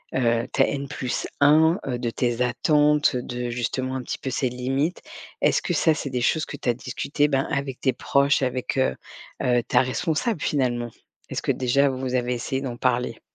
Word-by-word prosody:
heu, 120 -2 +1
ta - - +3
N+ 140 0 -3
1, 150 +6 +2
heu, 125 -2 -1
de 120 -1 -2
tes 120 0 -1
attentes, 150 +4 +3
de 125 0 -3
justement 130 +2 -2
un 130 - -3
petit - - -5
peu 135 - -4
ces 130 0 0
limites? 135 +7 -1 0.4
Est-ce - - +3
que - - -1
ça 160 - +3
c'est 140 -3 -4
des 125 -1 -1
choses 155 +5 +1
que - - -7
tu - - -2
as - - +4
discuté, 140 +4 -1
ben, 135 -2 0
avec 140 -3 -3
tes 130 - +2
proches 140 +3 +2
avec, 130 +1 -2
heu 130 - +2 0.5
heu, 120 -1 +2
ta 125 +2 +3
responsable 160 - -1
finalement? 120 -4 0 0.4
Est-ce - - -3
que - - +1
déjà 130 +2 +2
vous 130 -1 -3
avez 125 0 0
essayé 130 +2 -3
d'en 130 -3 -4
parler? 125 -2 0
130 Hz, 195 wpm, -24 LUFS, 125-140 Hz, 0.5 s, as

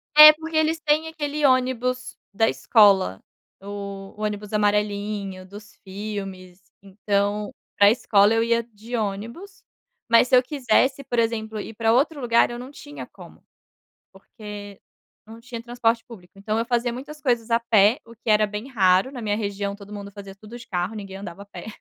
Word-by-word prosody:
É 305 0 +12
porque 320 +1 -8
eles 315 +1 +2
têm 310 0 +1
aquele 300 -2 -4
ônibus 255 -1 +1 0.2
da 225 +2 +2
escola, 195 - +4 0.4
o 200 -1 -7
ônibus 210 0 -4
amarelinho 205 -2 -1
dos 205 +2 -13
filmes, 195 -2 -7 0.2
então 205 +1 -1 0.3
para 200 0 +7
escola 210 -2 +3
eu 225 0 +2
ia 235 0 +2
de 230 +1 -8
ônibus, 230 - -5 0.4
mas 230 +1 +5
se 255 - +4
eu 250 - +5
quisesse, 270 0 +1
por 245 -2 -4
exemplo, 220 -2 -1
ir 220 - -7
para 225 +1 +1
outro 285 +4 +1
lugar 235 -1 +3
eu 240 - -6
não 255 +2 -8
tinha 290 0 -10
como. - - -15 0.7
Porque 205 0 -11 0.4
não 225 +1 -13
tinha 235 -1 -8
transporte 235 -1 0
público, 185 -7 -14
então 215 +2 -2
eu 230 - 0
fazia 240 0 0
muitas 290 +5 -9
coisas 240 -4 0
a 230 0 +3
pé, 220 0 +3
o 230 - -15
que 230 - -11
era 215 0 +4
bem 210 +4 -5
raro 195 0 +3
na 245 - -7
minha 205 -1 -1
região 200 -1 -3
todo 205 0 -13
mundo 200 0 -8
fazia 195 -1 -11
tudo 215 +4 -12
de 235 - -13
carro, 180 +3 -3
ninguém 195 -2 -8
andava 195 -1 -9
a - - -14
pé. 200 - -10
220 Hz, 175 wpm, -23 LUFS, 200-245 Hz, 0.7 s, É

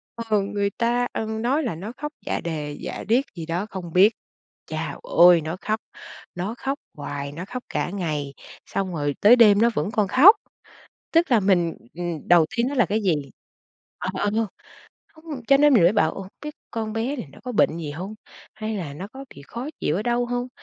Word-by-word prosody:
ờ, 225 -3 0
người 200 0 -1
ta, 240 +1 +1
ừm, 220 0 -3
nói 275 +6 +1
là 230 - -2
nó 195 +7 -6
khóc 295 0 -5
dạ - - -1
đề 150 -3 -4
dạ - - -5
điếc 245 +5 +3
gì 165 - -6
đó 170 +4 -2
không 175 -4 -7
biết. 200 +5 +6 0.5
Chao - - -4
ôi, 175 - +6
nó 160 +3 -4
khóc, 215 +1 -1 0.6
nó 195 +6 -3
khóc 275 +3 -3 0.2
hoài, 140 -1 -5
nó 170 +5 -7
khóc 250 +2 -6
cả - - -1
ngày, 155 -7 -3 0.3
xong 190 -2 -3
rồi 145 -2 -1
tới 220 +4 +8
đêm 210 -4 +6
nó 235 - +5
vẫn 155 +8 -1
còn 210 -3 +1
khóc, 325 - +8 0.8
tức 330 -4 +3
là 235 - +6
mình, 180 -4 +2 0.2
ừm, 170 -2 -5
đầu 175 -2 +6
tiên 235 +2 +2
nó 285 - -4
là 245 - +4
cái 215 +2 -1
gì? 180 -5 +3 0.8
Ờ, 185 - -3
ờ, 205 +2 0 0.8
không, 315 0 -21 0.2
cho 275 - +7
nên 290 -1 +5
mình 210 - +6
mới 175 +4 +6
bảo: 205 - +2
"Ồ, 190 -1 -7 0.2
biết 300 0 -5 0.2
con 220 -1 -3
bé 235 +6 -2
này 240 - -6
nó - - -14
có 250 - -4
bệnh 165 -6 +3
gì 155 -3 -5
hông? 185 +8 -6 0.4
Hay 215 0 -4
là 160 -7 -5
nó 185 +7 -7
có 270 +1 -9
bị 140 - -12
khó 240 +5 -6
chịu 150 - 0
ở 205 - -1
đâu 240 +1 0
hông?" 245 +1 -2
205 Hz, 210 wpm, -24 LUFS, 170-240 Hz, 0.8 s, tới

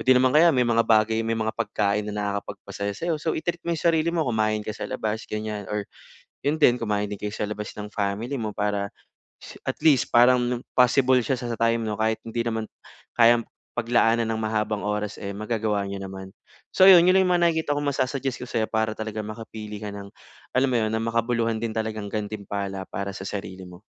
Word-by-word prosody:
di 130 - +6
naman 130 0 +4
kaya 165 +3 +6
may 125 - +4
mga 115 -1 +3
bagay, 110 0 +4
may 115 0 -1
mga 110 0 -1
pagkain 105 -2 -1
na 105 - -4
nakakapagpasaya 100 0 -4
sa'yo 165 0 -2
so, 160 - -1
i-treat 175 +1 -2
mo 170 0 -1
'yong 155 - -7
sarili 160 +1 +1
mo, 165 -2 0
kumain 110 -2 0
ka 110 - -3
sa - - -6
labas, 110 -3 -3
ganyan 105 -2 -4
or 105 -1 -2 0.6
'yon 150 +3 0
din, 125 -5 +6
kumain 105 -2 0
din 105 - -5
kayo 105 - -3
sa 105 - -2
labas 105 0 -5
ng 105 0 -7
family 105 +6 -2
mo 110 -1 -2
para 100 -1 -1 0.5
is - - -10 0.2
at - - -2
least 140 -6 +5
parang 120 0 +4 0.2
possible 125 +1 +5
siya 130 +2 -1
sa 125 - -6
sa 115 - -3
time 115 0 +2
'no, 105 -1 -3
kahit 110 0 0
hindi 115 +1 -2
naman 110 -1 -2 0.5
kayang 120 0 +6 0.4
paglaanan 115 -1 +2
ng 110 - -3
mahabang 110 -1 -1
oras, 105 0 -2
eh, 100 - -4
magagawa 110 -2 -1
niyo 100 0 -5
naman. 95 0 -8 0.4
So, 190 - +6
'yon, 175 -2 +9
'yon 185 +1 +5
lang 185 - +2
mga 175 -1 +3
nakikita 160 -3 -1
kong 145 - -2
masu-suggest 130 -2 -2
ko 125 - -6
sa'yo 110 - 0
para 110 -1 -1
talagang 110 -1 -4
makapili 110 -1 -7
ka 105 -1 -5
ng 100 0 -8 0.5
alam 135 0 +3
mo - - +1
'yon, 110 - 0
ng 110 0 -1
makabuluhan 115 0 0
din 115 - -1
talagang 110 -2 -3
gantimpala 100 -2 -4
para 100 0 -4
sa 95 0 -7
sarili 95 -2 -6
mo. 90 +1 -13
110 Hz, 210 wpm, -25 LUFS, 105-125 Hz, 0.6 s, yon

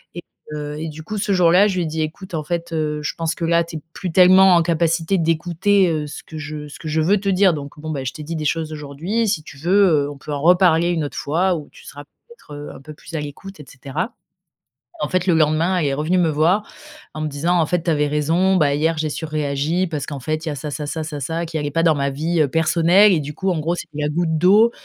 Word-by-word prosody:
Et, 175 - -7 0.3
heu, 150 0 -5
et, 160 +1 -4
du 155 +1 -9
coup, 215 +6 -5
ce 205 0 -1
jour-là, 180 +2 +5
je 195 - -2
lui 175 - +1
ai - - -2
dit: 160 +1 -3
«Écoute, 170 +4 -7
en 155 - -2
fait, 170 +1 -4
heu, 150 -1 -2
je - - -3
pense 165 0 -1
que 165 - -3
là 170 0 +3
tu 165 -1 -7
es 150 - -9
plus 180 -4 -5
tellement 185 +1 +6
en 170 - +5
capacité 165 +2 +1
d'écouter, 175 +4 +2
heu, 155 -2 -2
ce - - -8
que 160 - -10
je 150 0 -6
ce - - -11
que 160 - -8
je 155 +1 +1
veux 195 +6 +3
te 200 - -2
dire, 190 -1 +4
donc, 145 +1 -8
bon, 155 +1 -7
bah, 140 -3 -3
je 130 - -3
t'ai 155 - -9
dit 165 +2 -5
des 155 - -4
choses 160 +1 -1
aujourd'hui, 155 +10 -2
si 195 - 0
tu 145 - -12
veux, 190 +7 +3 0.2
heu, - - -5
on 145 - -10
peut 150 - -8
en 140 - -3
reparler 175 -1 +4
une 165 -3 -1
autre - - -7
fois 175 +5 +1
où 150 -3 -7
tu - - -17
seras, 145 - -10
peut-être, 470 - -18
heu, 145 0 -7
un - - -12
peu 155 +2 -10
plus 155 - -14
à 150 - -1
l'écoute» 155 +6 -9
et - - -13
cetera. 140 - -5 0.9
En - - -1
fait, 185 -1 0
le 180 - +3
lendemain 160 +4 +2
elle 155 - 0
est 135 - 0
revenue 160 +6 0
me 170 - +3
voir, 170 +8 +2 0.5
en 155 - -5
me - - -1
disant: 165 +5 0
«En 160 - +2
fait, 175 +1 -1
tu 170 - +1
avais 150 -2 +1
raison, 165 +6 +1
bah, 145 -4 +3
hier, 160 +2 0
j'ai 155 0 -1
surréagi 155 +3 -1
parce 150 -4 -4
qu'en 140 -3 -6
fait, 155 +4 -3
il - - -1
y - - -3
a 145 - -6
ça, 150 +1 -5
ça, 150 +1 -5
ça, 160 +2 -4
ça, 150 -2 -6
ça 165 +5 -2
qui 160 -1 -4
allait 145 -1 -2
pas 165 - +1
dans 160 -3 +4
ma 140 0 0
vie, 160 +4 -1
heu, 150 - +2
personnelle 170 +6 +4
et, 165 - +3
du 150 +1 -6
coup, 190 - -1
en 175 - 0
gros, 170 +3 -1
c'était 155 -3 -8
la 150 - 0
goutte 160 0 0
d'eau, 205 +7 +5
160 Hz, 285 wpm, -20 LUFS, 150-175 Hz, 0.9 s, tellement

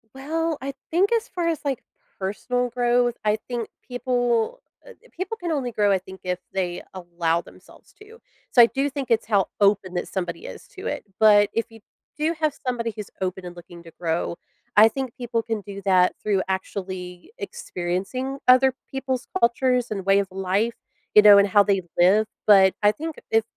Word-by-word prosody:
Well, 320 +3 -2
I 275 +1 -4 0.2
think 370 +6 +2
as 460 +1 +1
far 350 -7 -3
as, 325 -3 0
like, 275 -4 -2 0.4
personal 245 +6 -2
growth, 240 0 +1
I 210 0 +2
think 240 -2 -3 0.2
people, 245 - 0 0.3
uh, - - -12
th - - -23
people 380 +5 -4
can 345 -4 -4
only 270 -6 -1
grow, 205 -2 +2
I 190 - +3
think, 190 +1 -12
if 180 -1 -2
they 180 -2 -2
allow 170 -2 -1
themselves - - -18
to, 445 +2 -15 0.3
so 245 - +7
I - - +10
do 275 +4 -1
think 275 -2 -5
it's 230 -1 +2
how 200 -4 +2
open 200 -2 +3
that 175 - -3
somebody 175 -3 -4
is - - -10
to 395 +5 -6
it. - - -4
But 205 -1 +6
if 230 - 0
you 225 - -14 0.4
do 310 +2 0
have 305 -2 +2
somebody 235 -2 -1
who's 210 -2 -7
open 185 0 -3
and 175 0 -8
looking 175 0 -13
to 165 - -13
grow, 170 0 -1 0.4
I 215 +2 +8
think 260 0 -5
people 240 -2 -2
can 225 -2 -3
do 200 0 -9
that 185 -2 +4
through 200 -3 +1
actually 185 - -5
experiencing 255 - -4
other 255 +1 +6 0.2
people's 265 -1 -3
cultures 250 +1 +2
and 195 -3 -4
way 195 0 +4
of 200 - -1
life, 195 +5 -1 0.4
you 210 - +10
know, 205 -1 +9
and 200 - +5
how 200 +1 +5
they 200 -2 +1 0.2
live, 200 +5 +4 0.2
but 195 -2 +7
I 205 - +6
think 315 +6 -6 0.2
if 225 0 +4
220 Hz, 190 wpm, -24 LUFS, 190-265 Hz, 0.4 s, I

